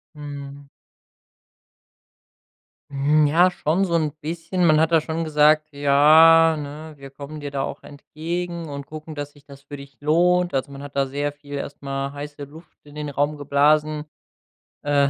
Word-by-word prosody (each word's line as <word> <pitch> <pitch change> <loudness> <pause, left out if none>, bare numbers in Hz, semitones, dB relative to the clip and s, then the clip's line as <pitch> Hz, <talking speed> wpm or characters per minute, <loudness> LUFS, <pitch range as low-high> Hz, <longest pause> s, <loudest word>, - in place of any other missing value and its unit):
Mhm. 140 -1 -9 2.2
Hm, 145 +2 +2
ja, 175 +5 +4
schon 180 0 0
so 175 - -3
'n 155 -2 +1
bisschen. 165 +3 -2
Man 155 -2 +5
hat 160 +1 +2
da 165 - +5
schon 160 +1 -3
gesagt: 155 0 +3
„Ja, 155 +3 +6
ne, 150 +2 -8
wir 140 0 -11
kommen 145 +2 -9
dir 145 -1 -6
da 140 -1 -2
auch - - -6
entgegen 170 +4 -6
und 140 -1 -7
gucken, 155 +1 -9
dass 145 -1 -6
sich 145 -1 -21
das 140 -1 -14
für 145 +1 -10
dich 140 -2 -13
lohnt.“ 175 +4 +2
Also, 135 +1 -2
man 140 0 -9
hat 145 -1 -10
da 140 -1 +2
sehr 145 +2 -2
viel 145 0 -13
erstmal 140 -1 -5
heiße 145 0 -8
Luft 155 +4 -14
in 145 - -15
den 150 -1 -5
Raum 145 +2 -1
geblasen, 150 +2 +1 0.8
äh. 145 -1 +2
150 Hz, 165 wpm, -22 LUFS, 140-160 Hz, 2.2 s, Ja